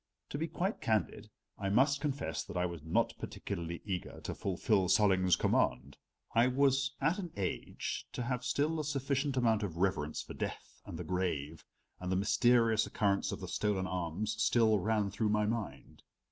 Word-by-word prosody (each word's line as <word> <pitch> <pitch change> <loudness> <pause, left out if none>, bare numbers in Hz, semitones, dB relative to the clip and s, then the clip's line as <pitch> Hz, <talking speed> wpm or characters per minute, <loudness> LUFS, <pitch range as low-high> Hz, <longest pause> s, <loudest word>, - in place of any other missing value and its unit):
To 145 - -4
be 165 - -1
quite 190 +5 -2
candid 110 -6 -1 0.3
I 100 - -1
must 140 +7 +3
confess 140 - -2
that - - -6
I 90 - +2
was 85 -3 -5
not 80 +1 +1
particularly 85 -3 -5
eager 95 -4 -4
to - - -4
fulfill 95 +1 +1
Solling's 95 -2 +4
command. 60 0 +1 0.4
I 115 +2 +5
was 135 +1 +2
at 165 +7 +1
an 175 -4 -5
age 95 -2 -3
to 125 - -3
have 125 0 -2
still 145 +5 0
a - - -1
sufficient 140 -1 -1
amount 115 -3 +3
of 90 -6 -4
reverence 85 -5 0
for - - -9
death - - -6
and - - -6
the - - -4
grave, 80 -5 -2 0.4
and 90 0 -3
the - - +2
mysterious 115 +2 +3
occurrence 100 -2 +1
of - - -5
the - - -5
stolen 100 -3 0
arms 90 +4 -2
still 110 -3 +4
ran 105 0 0
through 105 +2 0
my 105 0 +2
mind. 110 -1 -4
105 Hz, 175 wpm, -33 LUFS, 95-130 Hz, 0.4 s, I